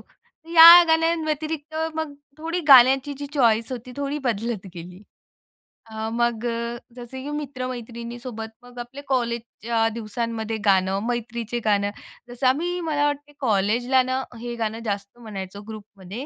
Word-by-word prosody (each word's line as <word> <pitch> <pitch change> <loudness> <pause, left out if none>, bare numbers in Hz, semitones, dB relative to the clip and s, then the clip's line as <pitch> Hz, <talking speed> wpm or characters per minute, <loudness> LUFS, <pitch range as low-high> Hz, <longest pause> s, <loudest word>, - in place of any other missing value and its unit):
तर 325 - -26
या 335 +2 +11
गाण्यांव्यतिरिक्त, 315 -1 0 0.2
मग 315 -2 -3 0.3
थोडी 330 +3 -3
गाण्याची 270 +2 +7
जी 285 - -5
चॉईस 230 -4 +2
होती 250 0 -7
थोडी 285 +1 -2
बदलत 225 -3 -2
गेली. 180 +3 -10 0.8
अ, 220 0 -5
मग 235 -1 0
अ, 235 0 -3 0.2
जसं 255 +2 -8
की 290 - -6
मित्र-मैत्रिणीसोबत 240 -4 -6
मग 245 0 -12
आपले 240 +4 -8
कॉलेजच्या 235 -2 -1
दिवसांमध्ये 225 0 -3
गाणं, 190 -1 +3
मैत्रीचे 235 -1 -3
गाणं. 205 -1 +2 0.4
जसं 245 +2 -1
आम्ही 345 +7 0
मला 295 -3 0
वाटते 290 0 -3
कॉलेजला 240 +3 +2
ना 260 +1 -2 0.2
हे 240 0 -5
गाणं 225 0 -3
जास्त 200 +2 -4
म्हणायचो 200 -3 -7
ग्रुपमध्ये. 210 +2 -9
240 Hz, 135 wpm, -23 LUFS, 220-275 Hz, 0.8 s, या